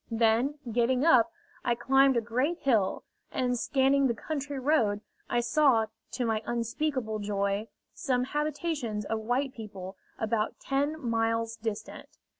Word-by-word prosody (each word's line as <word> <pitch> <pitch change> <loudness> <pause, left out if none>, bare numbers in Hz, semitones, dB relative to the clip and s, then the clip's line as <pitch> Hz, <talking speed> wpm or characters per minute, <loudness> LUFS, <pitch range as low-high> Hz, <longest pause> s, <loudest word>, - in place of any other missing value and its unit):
Then, 230 +4 +2 0.2
getting 245 +4 +2
up, 255 -3 +5 0.3
I 240 - +2
climbed 270 +1 +4
a - - +3
great 255 +9 0
hill, 225 - +1 0.3
and, 250 -1 0
scanning 270 +2 +3
the 235 - 0
country 285 +3 -4
round, 245 -7 +2 0.3
I 240 - +2
saw, 240 -2 +4 0.3
to 250 -1 -1
my 220 -1 0
unspeakable 235 -1 -1
joy, 200 +1 -1 0.3
some 255 -5 0
habitations 290 -6 -2
of 225 +1 -1
white 250 +5 -1
people, 195 -4 -8 0.2
about 220 -1 -1
ten 285 +3 -1
miles 230 -2 0
distant. 220 -1 -5
240 Hz, 135 wpm, -29 LUFS, 220-275 Hz, 0.3 s, up